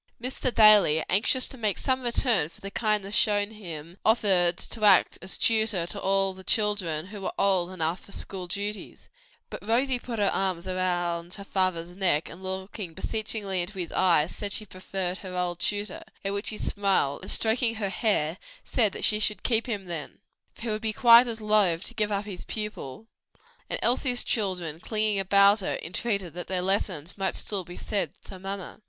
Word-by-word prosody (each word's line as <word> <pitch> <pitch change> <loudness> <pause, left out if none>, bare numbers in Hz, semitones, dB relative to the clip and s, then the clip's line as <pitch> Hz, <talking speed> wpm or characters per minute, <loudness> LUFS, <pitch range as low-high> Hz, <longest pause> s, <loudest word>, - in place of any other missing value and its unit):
Mr. 255 +1 -1
Daly, 210 -9 +6
anxious 240 +7 +2
to 265 - -12
make 210 -4 0
some 260 -1 0
return 235 - +1
for - - -19
the 195 - -8
kindness 210 -2 -1
shown 205 0 +2
him, 170 -4 -9
offered 190 -6 +3
to 225 - -4
act 200 -3 +5
as 190 - -5
tutor 220 -6 +2
to 200 +3 -5
all 195 0 +1
the 190 0 -13
children 190 -8 0
who 200 +1 -9
were 190 - -3
old 185 -3 +2
enough 170 -1 -2
for - - -15
school 190 -2 -6
duties; 205 +3 -5 0.4
but - - -7
Rosie 245 +4 +1
put 240 -1 -6
her 205 -2 +2
arms 185 -3 -1
about 175 -2 -2
her 200 - -7
father's 180 -3 -1
neck 180 -5 +1
and 175 - -12
looking 190 -1 -5
beseechingly 215 -4 -1
into 190 +3 -5
his 175 -3 -4
eyes, 170 -4 +2
said 205 -1 -4
she 215 - -2
preferred 185 -1 -4
her 185 -2 -7
old 175 -1 -2
tutor; 205 -1 -2 0.2
at 195 - -1
which 200 +1 -2
he 215 - -5
smiled, 195 -9 0
and 190 - -7
stroking 230 +1 +2
her 205 -3 -2
hair, 190 -6 0 0.2
said 220 -6 +1
she 210 - +4
should 210 0 0
keep 230 -1 +1
him 205 -5 -3
then, 170 -4 -6 0.4
for - - -16
he 235 - -3
would 215 0 -2
be 220 -1 -1
quite 235 +2 +7
as 225 -1 -4
loth 205 -5 +2
to - - -4
give 210 -2 0
up 200 0 -1
his 195 -4 -7
pupil, 210 - -5 0.6
and - - -1
Elsie's 245 0 +2
children, 180 -7 -2
clinging 215 +1 +1
about 200 +2 +5
her, 190 - -2
entreated 190 0 -2
that 175 0 -7
their 185 -1 -1
lessons 185 -2 -1
might 190 -1 -1
still 200 -3 -1
be 175 +1 -11
said 195 -8 -2
to 190 - -11
mamma. 195 +1 -6
195 Hz, 190 wpm, -27 LUFS, 180-215 Hz, 0.6 s, quite